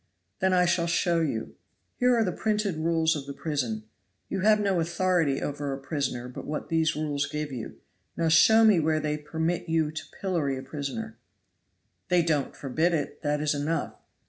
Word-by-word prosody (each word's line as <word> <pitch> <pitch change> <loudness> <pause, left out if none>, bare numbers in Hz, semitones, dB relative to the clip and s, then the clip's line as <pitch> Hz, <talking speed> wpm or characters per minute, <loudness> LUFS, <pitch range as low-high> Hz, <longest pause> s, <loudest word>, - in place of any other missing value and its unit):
"Then 190 -1 +2
I 180 -1 +4
shall 170 -1 +1
show 170 0 +2
you. 125 -8 -3 0.4
Here 250 -1 +4
are 225 - +3
the 185 - 0
printed 210 -2 -1
rules 160 0 +2
of 140 -2 -6
the 140 - -6
prison; 125 -10 -2 0.5
you - - -2
have 215 +2 +4
no 195 -3 +1
authority 170 -4 +1
over 145 -1 -3
a - - -4
prisoner 135 -3 -3
but 125 - -8
what 150 - -4
these 160 -1 +2
rules 145 -2 -1
give 150 0 -4
you. 120 -4 -6 0.4
Now 165 -1 +1
show 220 +8 +6
me 210 -5 +6
where 155 0 +1
they 150 0 -1
permit 160 +3 -2
you 160 -2 +1
to 160 0 -6 0.2
pillory 165 -8 -1
a 130 - -6
prisoner?" 190 +10 -5 0.9
"They 180 -1 +3
don't 150 -5 0
forbid 160 +6 0
it, 145 -3 -4
that 150 0 0
is 150 -1 +1
enough." 145 +2 -2
160 Hz, 185 wpm, -27 LUFS, 145-175 Hz, 0.9 s, show